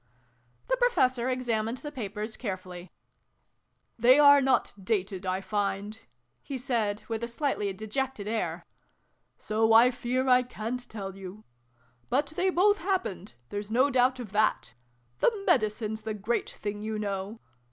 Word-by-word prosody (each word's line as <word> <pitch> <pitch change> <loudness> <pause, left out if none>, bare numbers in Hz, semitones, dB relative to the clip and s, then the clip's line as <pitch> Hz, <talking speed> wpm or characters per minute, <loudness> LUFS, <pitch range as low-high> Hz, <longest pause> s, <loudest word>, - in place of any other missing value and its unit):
The - - +1
Professor 260 - +2
examined 235 -2 -1
the 295 +2 -7
papers 215 -4 -5
care 200 -7 -3
fully. 180 -1 -11 1.1
"They 250 +4 +7
are 285 -1 +8
not 265 -1 +2
dated, 190 -2 -1
I 185 +1 -1
find," 205 +1 -2 0.4
he 275 - -5
said 230 -5 -1
with 225 0 -3
a - - -1
slightly 235 -5 -1
dejected 220 +2 -4
air: 220 0 -2 0.4
" - - -44 0.3
so 220 +1 +1
I 235 +3 +7
fear 255 +2 -1
I 250 0 +6
ca'n't 245 0 -5
tell 195 -3 -6
you. 195 +2 -10 0.7
But 285 +4 0
they 370 +2 +2
both 410 +3 +3
happened: 340 - -2
there's 205 0 -5
no 255 +5 +3
doubt 255 0 +3
of 225 -5 -7
that. 210 - +1 0.5
The - - +4
Medicine 215 -2 +1
s 220 - -7
the 215 0 -4
great 215 +4 -1
thing, 205 0 -5
you 215 0 -3
know. 200 +1 -4
225 Hz, 150 wpm, -28 LUFS, 205-255 Hz, 1.1 s, are